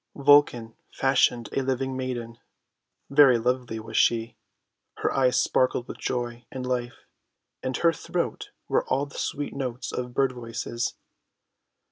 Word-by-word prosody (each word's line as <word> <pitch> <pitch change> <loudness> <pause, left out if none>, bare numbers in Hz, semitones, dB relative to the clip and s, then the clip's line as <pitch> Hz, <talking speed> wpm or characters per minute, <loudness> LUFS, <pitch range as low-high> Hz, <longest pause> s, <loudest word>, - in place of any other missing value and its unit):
Vulcan 140 -5 +4 0.2
fashioned 125 -3 +2
a 135 - +1
living 130 0 -1
maiden. 120 -3 -4 0.7
Very 140 -3 +7
lovely 125 -1 -1
was 110 0 -9
she. 115 0 +2 0.6
Her - - -1
eyes 130 -2 +3
sparkled 125 -1 +1
with - - -8
joy 120 -1 -3
and 130 -1 -5
life. 125 -1 -3 0.6
In 130 -1 -2
her 170 -1 +3
throat - - -3 0.2
were - - +2
all 135 +2 +1
the 140 - -9
sweet 145 0 -3
notes 125 -3 -4
of 125 0 -5
bird 135 -1 +3
voices. 120 0 -4
125 Hz, 135 wpm, -26 LUFS, 120-135 Hz, 0.7 s, Very